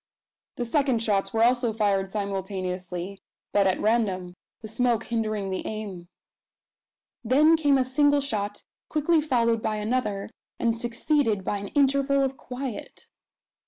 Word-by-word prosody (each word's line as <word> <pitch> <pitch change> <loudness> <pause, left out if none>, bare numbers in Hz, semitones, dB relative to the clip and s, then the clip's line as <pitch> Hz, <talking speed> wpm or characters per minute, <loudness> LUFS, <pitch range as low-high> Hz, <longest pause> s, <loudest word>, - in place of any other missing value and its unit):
The 245 - -3
second 255 -2 +1
shots 200 -3 +1
were 225 -1 +2
also 245 -1 +3
fired 200 -3 0
simultaneously, 190 -2 -4 0.3
but 200 -1 +3
at 190 - +1
random, 200 -5 0 0.3
the 220 - -7
smoke 235 +1 +1
hindering 215 -4 -2
the 185 - -3
aim. 200 -5 -6 1.2
Then 295 +7 +5
came 290 -3 +3
a 260 - +2
single 290 +2 +3
shot, 205 -6 -3 0.3
quickly 315 +1 +2
followed 235 -6 +1
by 215 - -1
another, 210 -2 -2 0.3
and 230 -1 +1
succeeded 235 -2 0
by 205 - -2
an 200 - -6
interval 275 0 +3
of 270 0 -1
quiet. 255 -3 -7
225 Hz, 135 wpm, -26 LUFS, 200-260 Hz, 1.2 s, Then